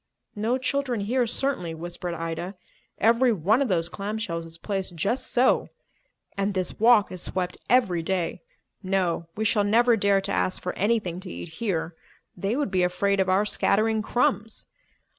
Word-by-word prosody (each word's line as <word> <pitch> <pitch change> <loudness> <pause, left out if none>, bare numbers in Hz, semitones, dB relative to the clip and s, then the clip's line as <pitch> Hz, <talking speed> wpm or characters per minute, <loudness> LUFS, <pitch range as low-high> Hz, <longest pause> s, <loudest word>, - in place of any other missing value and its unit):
"No 225 +4 0
children 260 -3 -1
here, 240 +4 +1
certainly," 220 -10 -2
whispered 175 +1 -5
Ida. 165 +3 -4 0.4
"Every 235 +3 +4
one 215 - +2
of 275 - +2
those 170 -5 +1
clam 200 +4 -4
shells 170 -7 -4
is 165 0 -7
placed 190 -1 -4
just 220 +10 -1
so. 250 +1 +3 0.7
And 200 0 -1
this 185 -1 -2
walk 225 -2 +5
is 185 -1 -6
swept 180 -1 -3
every 215 -9 +3
day. 175 0 -2 0.4
No, 185 -4 0
we 220 - -2
shall 215 -2 +3
never 235 +4 +4
dare 200 -2 +3
to 195 +1 -4
ask 185 - 0
for 180 - -4
anything 205 -4 0
to 185 -1 -8
eat - - -7
here. 170 -2 -2 0.4
They 195 +5 -1
would 285 -7 -1
be 185 - +2
afraid 195 +3 +1
of 190 -1 +2
our 190 +3 +3
scattering 215 +1 +2
crumbs." 225 -2 -1
200 Hz, 170 wpm, -25 LUFS, 180-225 Hz, 0.7 s, walk